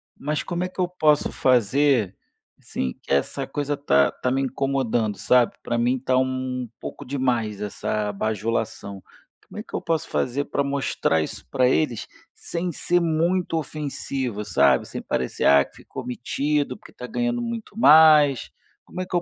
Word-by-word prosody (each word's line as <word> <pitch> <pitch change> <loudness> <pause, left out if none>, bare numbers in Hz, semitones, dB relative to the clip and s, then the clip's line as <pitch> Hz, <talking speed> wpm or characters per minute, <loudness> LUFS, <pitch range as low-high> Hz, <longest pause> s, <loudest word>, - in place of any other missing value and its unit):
Mas 150 +1 -2
como 175 0 -3
é 185 - -2
que 185 - -15
eu 180 - +2
posso 155 -4 +2
fazer, 125 -3 +2 0.4
assim, 65 - -4
que - - -10
essa 130 - 0
coisa 145 0 -2
tá 70 - +3
tá 125 - -2
me 135 - +1
incomodando, 130 -5 -1
sabe. 125 -2 +3
Pra 120 - -1
mim 125 +2 +1
tá 130 0 +1
um 130 -1 -1
pouco - - -8
demais 120 -6 -1
essa 105 0 -2
bajulação. 105 -2 -3 0.4
Como - - -9
é - - -5
que - - -20
eu - - -2
posso 165 -2 -1
fazer 140 +3 -1
pra 140 - -1
mostrar 140 - 0
isso 75 - -6
pra 125 - +2
eles 125 -6 0 0.3
sem 175 +1 -4
ser 175 +3 +1
muito 170 +1 0
ofensivo, 135 -6 -4
sabe, 70 -7 +3
sem - - -6
parecer: 65 - -2
"Ah, 70 0 +6
que - - -22
ficou - - -9
metido 140 +2 -1
porque - - -16
tá 125 - -8
ganhando 240 - -1
muito 230 -3 -6
mais". 150 - +6 0.3
Como 185 - -6
é - - -3
que 180 - -5
eu 175 - +3
135 Hz, 170 wpm, -24 LUFS, 115-155 Hz, 0.4 s, Ah